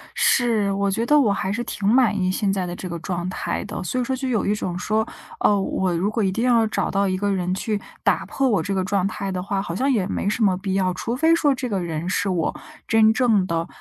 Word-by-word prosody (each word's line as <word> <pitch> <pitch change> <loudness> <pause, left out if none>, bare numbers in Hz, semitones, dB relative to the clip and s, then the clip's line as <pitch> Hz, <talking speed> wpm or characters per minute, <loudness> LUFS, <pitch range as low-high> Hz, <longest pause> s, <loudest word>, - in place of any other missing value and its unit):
是， 225 -5 +2
我 200 0 0
觉 225 +4 -1
得 295 +4 +5
我 235 -8 +3
还 190 -1 -1
是 230 +4 -2
挺 205 -4 -3
满 230 -1 +4
意 185 -1 +1
现 195 +1 0
在 190 -2 -1
的 175 0 -5
这 185 - -7
个 170 0 -5
状 175 +1 -3
态 185 - -3
的， - - -5
所 185 +8 -2
以 - - +1
说 260 +2 -1
就 265 +1 -4
有 235 -5 0
一 205 - +2
种 185 -4 -3
说， 215 +4 0 0.3
哦， 205 -1 +3
我 190 -1 -1
如 185 +5 0
果 220 0 0
一 190 - +1
定 225 +5 -2
要 235 -3 +4
找 - - -1
到 200 0 +1
一 185 0 0
个 200 +1 0
人 180 -1 -1
去 210 +2 -2 0.2
打 - - +2
破 275 - 0
我 205 -7 +2
这 195 +5 -3
个 190 -1 0
状 190 0 0
态 195 -1 -4
的 185 -1 -3
话， 195 +1 -2
好 170 -4 -5
像 270 +7 +1
也 215 -8 +1
没 200 - -1
什 220 +2 0
么 190 -3 +3
必 190 0 -3
要， 185 -1 +1
除 230 +6 -3
非 320 +5 +3
说 295 -4 +3
这 250 -1 -4
个 200 -3 -1
人 170 -1 -4
是 195 +1 0
我 175 -4 -1 0.3
真 220 -1 +5
正 220 -5 +3
的 165 0 -1
200 Hz, 290 characters per minute, -22 LUFS, 185-225 Hz, 0.3 s, 得